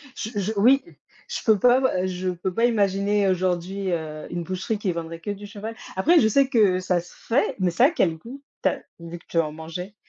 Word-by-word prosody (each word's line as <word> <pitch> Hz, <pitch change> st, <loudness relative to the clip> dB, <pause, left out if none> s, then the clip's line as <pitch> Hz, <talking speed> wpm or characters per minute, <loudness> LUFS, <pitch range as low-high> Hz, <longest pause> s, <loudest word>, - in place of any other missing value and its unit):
Je 220 Hz, -, -4 dB
je 200 Hz, +1 st, -1 dB
oui, 260 Hz, +6 st, +5 dB, 0.5 s
je -, -, -3 dB
peux 220 Hz, -2 st, +5 dB
pas, 245 Hz, +5 st, +5 dB, 0.2 s
heu, -, -, 0 dB
je 185 Hz, 0 st, -3 dB
peux 180 Hz, +1 st, -3 dB
pas 230 Hz, -, +2 dB
imaginer 200 Hz, -2 st, +2 dB
aujourd'hui, 185 Hz, +1 st, -1 dB
heu, 155 Hz, -2 st, -4 dB
une 175 Hz, -, -4 dB
boucherie 185 Hz, +5 st, -3 dB
qui 200 Hz, -2 st, -1 dB
vendrait 165 Hz, 0 st, -6 dB
que -, -, -6 dB
du 205 Hz, 0 st, -7 dB
cheval. 215 Hz, +2 st, -7 dB, 0.2 s
Après, 325 Hz, -, +4 dB
je 220 Hz, -, +4 dB
sais 270 Hz, +5 st, +3 dB
que 210 Hz, -8 st, +3 dB
ça 180 Hz, -1 st, 0 dB
se 175 Hz, -, -12 dB
fait, 245 Hz, +5 st, 0 dB
mais 185 Hz, -2 st, +1 dB
ça 235 Hz, +9 st, +4 dB
a -, -, +6 dB
quel 170 Hz, -, +1 dB
goût? 245 Hz, -, -11 dB, 0.2 s
Tu -, -, +5 dB
as -, -, -5 dB, 0.2 s
vu 170 Hz, 0 st, -8 dB
que 170 Hz, -, -20 dB
tu 165 Hz, -, 0 dB
en 155 Hz, -2 st, 0 dB
mangeais. 170 Hz, +5 st, -7 dB
190 Hz, 230 wpm, -24 LUFS, 175-220 Hz, 0.5 s, a